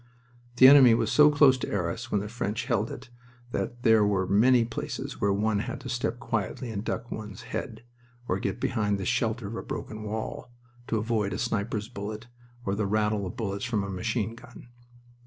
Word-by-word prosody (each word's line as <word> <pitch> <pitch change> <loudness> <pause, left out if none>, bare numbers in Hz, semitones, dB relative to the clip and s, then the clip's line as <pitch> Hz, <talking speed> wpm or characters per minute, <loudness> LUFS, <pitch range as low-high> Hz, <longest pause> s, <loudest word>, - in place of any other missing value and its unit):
The 130 +1 +9
enemy 130 -4 +8
was - - 0
so 150 0 +7
close 145 -3 +5
to - - -4
Arras 100 +6 -3
when 100 - +1
the 105 - -5
French 115 0 -3
held 115 -4 0
it 125 0 -9 0.4
that 120 +1 -4
there 110 -2 +5
were 100 -2 +1
many 115 +5 +4
places 115 - -5
where 100 - +3
one 105 +1 +1
had - - -4
to 130 - -7
step 120 0 -2
quietly 115 -1 -3
and 100 -2 -4
duck 120 +1 -4
one's 105 0 -7
head, 115 -2 -6 0.4
or - - 0
get - - -3
behind 105 -2 0
the 95 - -4
shelter 115 -1 0
of 105 +3 -5
a - - -4
broken 110 0 -6
wall, 110 +3 -5 0.4
to 115 - 0
avoid 110 -2 -1
a - - -3
sniper's 110 -2 -2
bullet 110 -1 -6 0.4
or 100 - 0
the 100 0 -1
rattle 105 -1 0
of 115 - -8
bullets 100 -3 -3
from 110 -4 -1
a 100 - -4
machine 110 +3 -2
gun. 120 +1 -14
110 Hz, 195 wpm, -27 LUFS, 105-120 Hz, 0.4 s, The